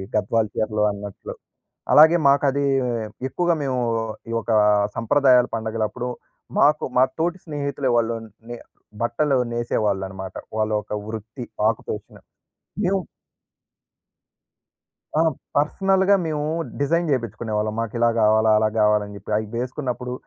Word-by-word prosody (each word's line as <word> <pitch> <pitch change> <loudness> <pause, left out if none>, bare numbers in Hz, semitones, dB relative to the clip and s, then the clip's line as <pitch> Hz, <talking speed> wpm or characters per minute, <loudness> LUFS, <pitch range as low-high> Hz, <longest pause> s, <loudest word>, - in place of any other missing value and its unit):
గద్వాల్ 105 +1 +1
చీరలు 105 -1 0
అన్నట్లు. 100 -1 -8 0.6
అలాగే 160 +3 +8
మాకది 140 0 +2 0.6
ఎక్కువగా 175 +4 +1
మేము 130 -2 -1 0.5
ఈ - - -3
ఒక 115 - -6 0.5
సంప్రదాయాల 125 +1 +4
పండుగల 110 -1 -2
అప్పుడు 125 +2 -5 0.5
మాకు 150 +1 +4
మా 130 - +7
తోటి 175 +2 0
స్నేహితులే 140 -3 -3
వాళ్ళు 115 0 +1 0.3
నె 120 - -5 0.5
బట్టలు 130 +4 +1
నేసేవాళ్ళనమాట. 95 -5 -2 0.2
వాళ్ళ 110 0 0
ఒక - - -11 0.2
వృత్తి 115 +3 -7 0.2
ఆక్యుపేషన్. 105 -1 -5 0.6
మేము 195 +1 +1 2.2
ఆ! - - +5 0.4
పర్సనల్‌గా 190 +6 +3
మేము 150 -2 -2 0.3
డిజైన్ 165 +3 +1
చేపించుకునేవాళ్ళం. 110 -3 -2
మాకు 115 0 -3
ఇలా 120 0 +4
గావాలి. 110 +1 +4
అలా 110 - +3
గావాలని 105 -1 +2
చెప్పి. 100 +2 -9
అవి 110 -1 -3
వేసుకున్నప్పుడు 125 0 -3
120 Hz, 110 wpm, -22 LUFS, 110-145 Hz, 2.2 s, అలాగే